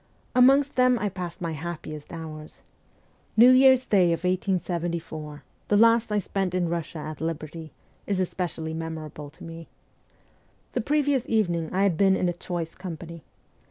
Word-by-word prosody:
Amongst 270 Hz, +3 st, +5 dB
them 255 Hz, -1 st, +5 dB
I 210 Hz, -2 st, -1 dB
passed 180 Hz, -1 st, -7 dB
my 170 Hz, -1 st, -2 dB
happiest 155 Hz, -1 st, -7 dB
hours. 155 Hz, -2 st, -9 dB, 0.7 s
New 240 Hz, +3 st, +9 dB
Year's 260 Hz, 0 st, +6 dB
day 190 Hz, -4 st, +4 dB
of 170 Hz, 0 st, 0 dB
1874, 170 Hz, -5 st, -2 dB, 0.2 s
the 205 Hz, -, +3 dB
last 230 Hz, 0 st, +4 dB
I 210 Hz, -, +2 dB
spent 195 Hz, -2 st, -2 dB
in 180 Hz, -1 st, +1 dB
Eussia 170 Hz, -1 st, -3 dB
at 155 Hz, -, -11 dB
liberty, 160 Hz, 0 st, -5 dB, 0.4 s
is 200 Hz, -2 st, 0 dB
especially 170 Hz, -3 st, -3 dB
memorable 160 Hz, -2 st, -6 dB
to 150 Hz, -, -16 dB
me. 165 Hz, 0 st, -9 dB, 1.1 s
The 245 Hz, -, 0 dB
previous 285 Hz, 0 st, +1 dB
evening 175 Hz, -8 st, 0 dB
I 190 Hz, +2 st, +1 dB
had 190 Hz, -5 st, +2 dB
been 195 Hz, -1 st, +4 dB
in 180 Hz, -, 0 dB
a 175 Hz, -, 0 dB
choice 175 Hz, -2 st, -5 dB
company. 170 Hz, -2 st, -8 dB
175 Hz, 155 wpm, -26 LUFS, 165-205 Hz, 1.1 s, New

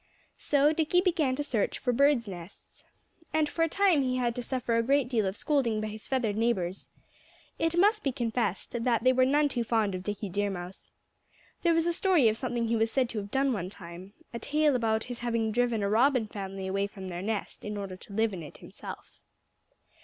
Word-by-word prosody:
So 290 Hz, +1 st, +3 dB
Dickie 320 Hz, +3 st, +2 dB
began 325 Hz, -8 st, +1 dB
to 290 Hz, -, -2 dB
search 235 Hz, -8 st, -1 dB
for 245 Hz, -, -1 dB
birds' 275 Hz, -2 st, +3 dB
nests. 180 Hz, -1 st, -11 dB, 0.5 s
And 310 Hz, -1 st, +3 dB
for 330 Hz, -, -4 dB
a 330 Hz, -, +3 dB
time 380 Hz, -4 st, +3 dB
he 255 Hz, -1 st, 0 dB
had 240 Hz, -2 st, 0 dB
to 245 Hz, -, -3 dB
suffer 245 Hz, -1 st, -2 dB
a 230 Hz, -, +3 dB
great 275 Hz, +2 st, +2 dB
deal 220 Hz, -6 st, +1 dB
of 190 Hz, +2 st, -3 dB
scolding 260 Hz, -8 st, +1 dB
by 215 Hz, 0 st, -3 dB
his 215 Hz, +1 st, -9 dB
feathered 240 Hz, -6 st, 0 dB
neighbors. 195 Hz, -5 st, -1 dB, 0.7 s
It 330 Hz, +1 st, 0 dB
must 420 Hz, +4 st, +4 dB
be 275 Hz, -, +1 dB
confessed 235 Hz, -5 st, -2 dB
that 235 Hz, -1 st, 0 dB
they 255 Hz, 0 st, +5 dB
were 255 Hz, 0 st, +4 dB
none 295 Hz, +2 st, +3 dB
too 245 Hz, -4 st, -2 dB
fond 220 Hz, -3 st, +1 dB
of 185 Hz, -, -4 dB
Dickie 205 Hz, +1 st, -4 dB
Deer 205 Hz, +2 st, 0 dB
Mouse. 180 Hz, 0 st, -8 dB, 0.7 s
There 335 Hz, -1 st, +3 dB
was 330 Hz, 0 st, +2 dB
a 345 Hz, -, +1 dB
story 345 Hz, -, +3 dB
of 215 Hz, -, 0 dB
something 240 Hz, -2 st, -1 dB
he 230 Hz, -, +1 dB
was 225 Hz, 0 st, +2 dB
said 255 Hz, 0 st, +1 dB
to 225 Hz, -, -3 dB
have 200 Hz, 0 st, -7 dB
done 270 Hz, +3 st, +1 dB
one 185 Hz, -5 st, -3 dB
time 185 Hz, 0 st, -11 dB, 0.2 s
a 235 Hz, -, -4 dB
tale 300 Hz, 0 st, +2 dB
about 220 Hz, -2 st, +1 dB
his 245 Hz, -1 st, -7 dB
having 230 Hz, -2 st, 0 dB
driven 235 Hz, -2 st, +1 dB
a -, -, +1 dB
Robin 245 Hz, +3 st, +3 dB
family 195 Hz, -2 st, -6 dB
away 195 Hz, +1 st, 0 dB
from 195 Hz, -2 st, -9 dB
their 175 Hz, 0 st, -5 dB
nest, 210 Hz, +1 st, -4 dB
in 210 Hz, 0 st, -4 dB
order 195 Hz, -2 st, -5 dB
to 200 Hz, -, -13 dB
live 220 Hz, 0 st, +1 dB
in 180 Hz, -, -5 dB
it 150 Hz, -, -10 dB
himself. -, -, -10 dB
235 Hz, 220 wpm, -29 LUFS, 205-275 Hz, 0.7 s, they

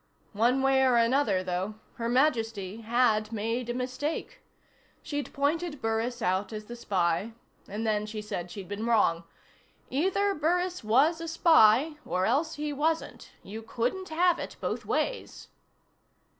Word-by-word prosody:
One 240 Hz, +5 st, +2 dB
way 270 Hz, 0 st, +4 dB
or 255 Hz, -2 st, +4 dB
another, 230 Hz, -5 st, +2 dB
though, 185 Hz, +3 st, -3 dB, 0.2 s
Her 230 Hz, 0 st, -2 dB
Majesty 225 Hz, -7 st, +1 dB
had 225 Hz, -2 st, +2 dB
made 230 Hz, +3 st, -2 dB
a -, -, 0 dB
mistake. 280 Hz, -, -4 dB, 0.6 s
She'd 290 Hz, -1 st, -4 dB
pointed 295 Hz, +2 st, -1 dB
Burris 225 Hz, +2 st, -2 dB
out 190 Hz, +4 st, 0 dB
as 215 Hz, -1 st, -6 dB
the 240 Hz, -, -8 dB
spy, 195 Hz, -1 st, 0 dB, 0.3 s
and 215 Hz, +3 st, -4 dB
then 210 Hz, -1 st, 0 dB
she'd 215 Hz, 0 st, -6 dB
said 180 Hz, -4 st, -5 dB
she'd 190 Hz, +1 st, -8 dB
been 205 Hz, +3 st, -4 dB
wrong. 170 Hz, -7 st, +2 dB, 0.7 s
Either 385 Hz, +8 st, +1 dB
Burris 355 Hz, +1 st, 0 dB
was 280 Hz, +10 st, +3 dB
a 330 Hz, -, -5 dB
spy, 310 Hz, -3 st, +5 dB
or 185 Hz, +1 st, -1 dB
else 295 Hz, +9 st, +1 dB
he 295 Hz, 0 st, -3 dB
wasn't. 320 Hz, +3 st, -2 dB
You 215 Hz, +3 st, -7 dB
couldn't 245 Hz, +12 st, -3 dB
have 345 Hz, +2 st, +2 dB
it -, -, -6 dB
both -, -, -3 dB
ways. -, -, -2 dB
240 Hz, 145 wpm, -28 LUFS, 215-300 Hz, 0.7 s, spy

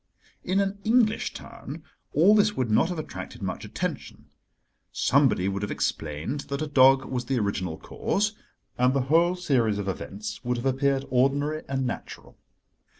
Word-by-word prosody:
In 190 Hz, +1 st, +1 dB
an 200 Hz, 0 st, -1 dB
English 225 Hz, -1 st, +2 dB
town -, -, -9 dB, 0.3 s
all 210 Hz, -, +5 dB
this 210 Hz, 0 st, +3 dB
would 125 Hz, -4 st, 0 dB
not 110 Hz, -, +3 dB
have 180 Hz, -, -3 dB
attracted 155 Hz, -, -7 dB
much -, -, -4 dB
attention. -, -, -5 dB, 0.6 s
Somebody 130 Hz, -8 st, +2 dB
would 100 Hz, 0 st, -2 dB
have 105 Hz, -, -3 dB
explained 80 Hz, -, -2 dB
that 140 Hz, +2 st, -2 dB
a -, -, -1 dB
dog 135 Hz, -2 st, +5 dB
was 125 Hz, -1 st, -3 dB
the 135 Hz, -, 0 dB
original 95 Hz, -6 st, -2 dB
cause, 210 Hz, +2 st, -1 dB, 0.5 s
and 125 Hz, +2 st, +3 dB
the 135 Hz, -, +2 dB
whole 170 Hz, +2 st, +4 dB
series 125 Hz, -, +1 dB
of 100 Hz, -1 st, -4 dB
events 215 Hz, -, -5 dB
would 125 Hz, 0 st, -1 dB
have 120 Hz, -, -5 dB
appeared 135 Hz, +1 st, +1 dB
ordinary 140 Hz, +4 st, +1 dB
and 135 Hz, -1 st, -1 dB
natural. 125 Hz, -, -6 dB
135 Hz, 160 wpm, -26 LUFS, 120-175 Hz, 0.6 s, all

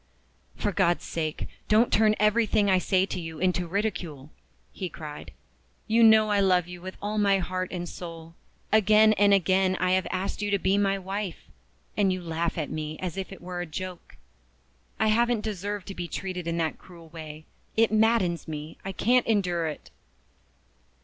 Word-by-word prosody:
"For 205 Hz, -, -1 dB
God's 175 Hz, -2 st, +1 dB
sake, 155 Hz, -2 st, -3 dB, 0.2 s
don't 220 Hz, +3 st, +3 dB
turn 215 Hz, -1 st, +4 dB
everything 210 Hz, -1 st, +3 dB
I 185 Hz, -, +4 dB
say 185 Hz, 0 st, +2 dB
to 185 Hz, -, -4 dB
you 165 Hz, -2 st, -7 dB
into 180 Hz, 0 st, 0 dB
ridicule!" 170 Hz, -7 st, -3 dB, 0.4 s
he 185 Hz, -, -5 dB
cried. 150 Hz, -3 st, -9 dB, 0.5 s
"You 225 Hz, +1 st, +2 dB
know 220 Hz, -1 st, +6 dB
I 205 Hz, -, +3 dB
love 180 Hz, -3 st, +3 dB
you 180 Hz, 0 st, -9 dB
with 185 Hz, +1 st, -8 dB
all 210 Hz, +1 st, -1 dB
my 200 Hz, -1 st, +4 dB
heart 185 Hz, 0 st, -3 dB
and 175 Hz, -1 st, -4 dB
soul. 165 Hz, -1 st, -9 dB, 0.4 s
Again 215 Hz, 0 st, +5 dB
and 205 Hz, -1 st, +4 dB
again 190 Hz, 0 st, +3 dB
I 185 Hz, 0 st, +1 dB
have 185 Hz, 0 st, +2 dB
asked 185 Hz, +3 st, -3 dB
you 205 Hz, -, -1 dB
to 200 Hz, -, +2 dB
be 190 Hz, +1 st, +1 dB
my 200 Hz, -1 st, +2 dB
wife 195 Hz, -1 st, -5 dB, 0.5 s
and 195 Hz, -2 st, +2 dB
you 185 Hz, -, -2 dB
laugh 170 Hz, 0 st, -2 dB
at 155 Hz, -3 st, -3 dB
me 155 Hz, 0 st, -4 dB
as 185 Hz, -2 st, -4 dB
if 190 Hz, 0 st, -5 dB
it 195 Hz, -, -10 dB
was 180 Hz, 0 st, -4 dB
a -, -, -3 dB
joke. 180 Hz, +2 st, -7 dB, 0.8 s
I 220 Hz, -, +3 dB
haven't 235 Hz, +1 st, +2 dB
deserved 205 Hz, -1 st, -4 dB
to -, -, -5 dB
be 175 Hz, -2 st, -5 dB
treated 180 Hz, -1 st, -5 dB
in 170 Hz, 0 st, -1 dB
that 160 Hz, -2 st, -1 dB
cruel 170 Hz, -3 st, -15 dB
way. 155 Hz, -1 st, -9 dB, 0.3 s
It 225 Hz, -1 st, +4 dB
maddens 215 Hz, -6 st, +2 dB
me 155 Hz, 0 st, -7 dB
I 195 Hz, -, -5 dB
can't 245 Hz, +6 st, +2 dB
endure 180 Hz, -7 st, +1 dB
it!" 155 Hz, -, -7 dB
185 Hz, 185 wpm, -27 LUFS, 170-205 Hz, 0.8 s, know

